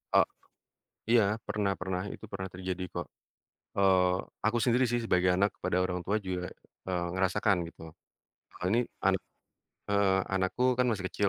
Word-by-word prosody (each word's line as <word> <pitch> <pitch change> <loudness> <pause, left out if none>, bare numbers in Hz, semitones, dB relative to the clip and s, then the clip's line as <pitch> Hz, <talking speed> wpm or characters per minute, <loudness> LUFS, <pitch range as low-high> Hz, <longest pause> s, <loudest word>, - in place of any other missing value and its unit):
Oh, - - +8 0.9
iya 120 -2 +6 0.2
pernah 100 -2 0
pernah 90 0 -2
itu - - -8
pernah 95 -1 -4
terjadi 90 0 -4
kok, 85 +1 -4 0.7
eee, 95 -2 +4 0.3
aku 115 +2 +2
sendiri 125 +1 +4
sih 120 0 0
sebagai 90 -4 +3
anak 100 +1 +3
kepada 90 - 0
orang 90 -1 -1
tua 100 - +1
juga, 90 -1 -3 0.4
eee, 90 -1 0
ngerasakan 95 +1 +2
gitu. 80 - -12 0.8
Oh - - -2
ini 120 +3 +2 0.2
anak - - +3 0.7
heeh, 100 -1 +3 0.2
anakku 110 +7 +1
kan 125 - +4
masih 100 -4 -2
kecil, 100 -1 +1
95 Hz, 155 wpm, -30 LUFS, 90-105 Hz, 0.9 s, Oh